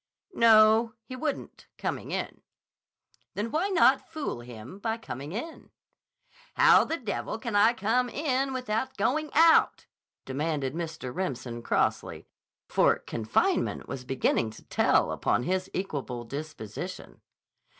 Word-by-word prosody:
"No, 225 -2 +5
he 255 +4 -8
wouldn't, 285 +2 -5
coming - - -4
in." - - -4 0.9
"Then 220 +3 -3
why 345 +6 0
not 330 -8 +4
fool 310 - -4
him 120 - -10
by 225 +2 -2
coming 145 - -7
in?" 280 - -7 0.9
"How - - +6
the 325 - -2
devil 220 -3 -4
can 230 -2 -4
I 220 +3 +5
come 240 +4 +1
in 270 -1 -1
without 255 0 -2
going 305 +3 0
out?" 325 +1 +5 0.4
demanded 140 0 -2
Mr. 160 -6 -5
Remsen 130 -9 -4
crossly, - - -1 0.4
for - - +3
confinement 110 -1 -1
was 130 - -6
beginning 125 -3 0
to - - -14
tell - - +2
upon 120 - 0
his 185 +3 -1
equable 135 -10 -4
disposition. 120 - -7
205 Hz, 125 wpm, -28 LUFS, -, 0.9 s, How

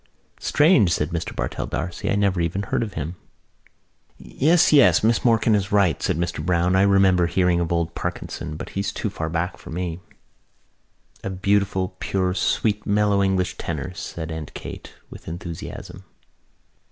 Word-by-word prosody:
"Strange," 145 - +4
said 75 -1 0
Mr 85 -1 -4
Bartell - - -3
D'Arcy. 85 +5 -3
"I - - +2
never 100 -3 +1
even 85 +4 -1
heard - - -1
of 110 -4 -3
him." 80 +3 -4 1.0
"Yes, 155 - +2
yes, 140 -6 +6
Miss 115 0 +2
Morkan 115 -2 +3
is 100 -1 0
right," 100 -6 +3
said - - 0
Mr 85 -2 -2
Browne. 90 +1 +2
"I 95 - +4
remember 95 -3 +4
hearing 90 0 +2
of 85 -1 -1
old 85 -1 0
Parkinson 85 -3 -5
but - - -7
he's 100 +1 -2
too - - -3
far 80 0 -4
back 85 +3 -2
for - - -12
me." 85 0 -4 1.2
"A - - -3
beautiful 95 -1 0
pure 95 -2 0
sweet 105 +2 0
mellow 100 -1 +2
English 95 -2 0
tenor," 80 +1 -4
said 80 -2 -6
Aunt 80 -2 -7
Kate - - -8 0.2
with - - -12
enthusiasm. 85 0 -7
90 Hz, 160 wpm, -23 LUFS, 85-100 Hz, 1.2 s, yes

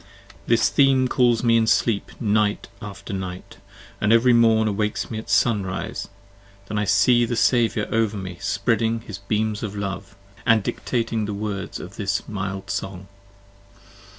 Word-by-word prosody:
r - - -22
I - - -3
"'HIS 115 - +3
theme 135 -2 +4
calls 120 -2 +2
me 115 -1 +4
in 110 -1 +2
sleep 110 -2 0
night 105 -2 +1
after 100 -1 -8
night, 95 -1 -6 0.2
& - - -22
ev'ry 115 +4 +4
morn 115 -2 +4
Awakes 105 +2 -2
me 110 - -3
at 110 - -10
sun 110 -5 +3
rise, 90 -1 -4 0.6
then 105 +1 -3
I 105 - 0
see 120 +5 +4
the 120 +1 -1
Saviour 115 -2 +2
over 110 -2 +1
me 95 -2 -5
5 85 - -15
Spreading 115 0 0
his 105 -3 -8
beams 105 +1 -1
of 105 -2 -5
love, 100 -1 -5 0.2
& 115 -3 +3
dictating 110 +2 -2
the 105 -1 -4
words 100 -1 -4
of 90 +2 -10
this 100 -2 -2
mild 95 -1 -4
song. 95 0 -5
105 Hz, 170 wpm, -23 LUFS, 100-115 Hz, 0.6 s, theme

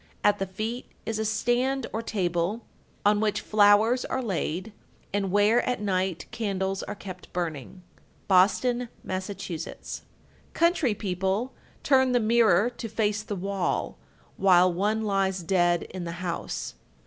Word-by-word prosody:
At 205 - +4
the 195 - -1
feet 220 +6 -4 0.2
is 225 -1 -2
a 220 - 0
stand 245 +4 +1
or 225 - -1
table, 185 0 -1 0.4
on 205 0 +4
which 210 -2 +1
flowers 215 +4 +4
are 260 - -2
laid, 190 -1 -3 0.4
and 200 -1 0
where, 205 +4 +4
at 250 - -1
night, 190 -3 -1
candles 195 -3 -2
are 205 - -5
kept 185 -3 -10
burning. 170 0 -4 0.4
Boston, 230 +6 +3
Mass. 185 +1 -3
1243. 175 -5 -6 0.5
Country 335 - +2
people 195 +4 -1 0.3
turn 260 -2 +4
the 245 - +4
mirror 225 -2 +4
to 235 -1 -7
face 210 -1 0
the 210 -1 -5
wall 195 0 -2 0.4
while 185 -2 +5
one 210 +5 0
lies 195 -3 0
dead 175 -1 +2
in 185 -1 -7
the 170 - -4
house. 180 -1 -4
205 Hz, 140 wpm, -27 LUFS, 185-225 Hz, 0.5 s, while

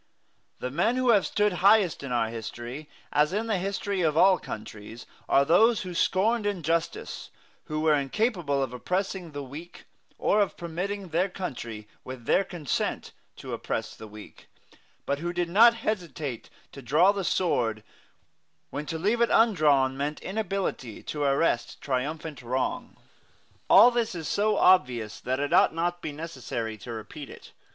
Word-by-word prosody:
The 125 - -4
men 200 - +1
who 255 -1 +1
have 205 -4 +3
stood 210 -1 +1
highest 200 -3 +4
in 140 -2 -6
our 115 -2 +1
history, 120 +5 -7 0.2
as 150 +4 +3
in 215 +3 -1
the 215 -4 0
history 195 0 -2
of 155 -2 +1
all 190 +2 +6
countries, 110 +2 -9 0.2
are 140 - +4
those 220 +9 +4
who 180 -1 -6
scorned 205 +5 +1
injustice, 170 -4 -2 0.4
who 155 0 -3
were 155 -1 +4
incapable 145 - 0
of 130 -2 -5
oppressing 185 +6 -2
the 145 -2 -6
weak, 150 +6 -10 0.3
or 210 - +2
of 200 - -1
permitting 185 +3 -4
their 175 +5 +1
country, 120 - -6 0.2
with 130 -2 -9
their 195 - +3
consent, 175 -7 -3 0.2
to - - -8
oppress - - -4
the 110 - -10
weak, 105 0 -13 0.6
but 140 0 -1
who 175 +2 -3
did 175 -1 -2
not 230 +6 +6
hesitate 165 - -4 0.2
to 140 - -10
draw 155 +10 +4
the 200 -1 -3
sword 115 - 0 0.9
when 150 +1 -5
to 165 - -3
leave 210 +8 +1
it 235 - +4
undrawn 150 - +4
meant 145 +2 -3
inability 195 - -3
to 150 - -5
arrest 140 -2 +1
triumphant 145 +3 -3
wrong. 125 +2 -3 0.7
All 245 - +8
this 235 -4 -1
is 160 -3 -5
so 210 0 +1
obvious 125 - +3
that 130 +1 -2
it 145 0 -1
ought - - +5
not 175 +1 -1
to - - -35
be 155 - -4
necessary 130 -7 -5
to 120 - -8
repeat 115 +6 -8
it. - - -13
160 Hz, 160 wpm, -27 LUFS, 130-195 Hz, 0.9 s, All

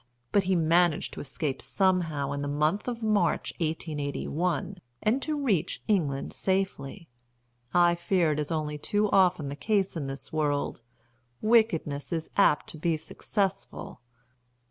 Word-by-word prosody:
But 200 -2 +3
he 190 0 +2
managed 170 0 +2
to - - -7
escape 140 -1 -3
somehow 165 -7 +1
in 140 0 -3
the 145 - -2
month 150 - 0
of 235 -2 -3
March 215 -2 +1
1881, 160 +2 -2 0.2
and 235 +6 +2
to 305 0 -1
reach 215 - 0
England 150 -10 0
safely. 190 -3 -2 0.6
I 175 -1 +5
fear 170 -1 +1
it 150 - -1
is 150 +2 -2
only 150 -2 -2
too 205 +5 0
often 180 -6 +4
the 140 - -5
case 195 +3 0
in 150 -4 -3
this 135 +3 -7
world 145 -5 0 0.6
wickedness 215 -11 +2
is 165 -2 -3
apt 195 -7 +4
to 155 - -8
be 165 0 +1
successful." 195 - -3
170 Hz, 145 wpm, -28 LUFS, 150-195 Hz, 0.6 s, I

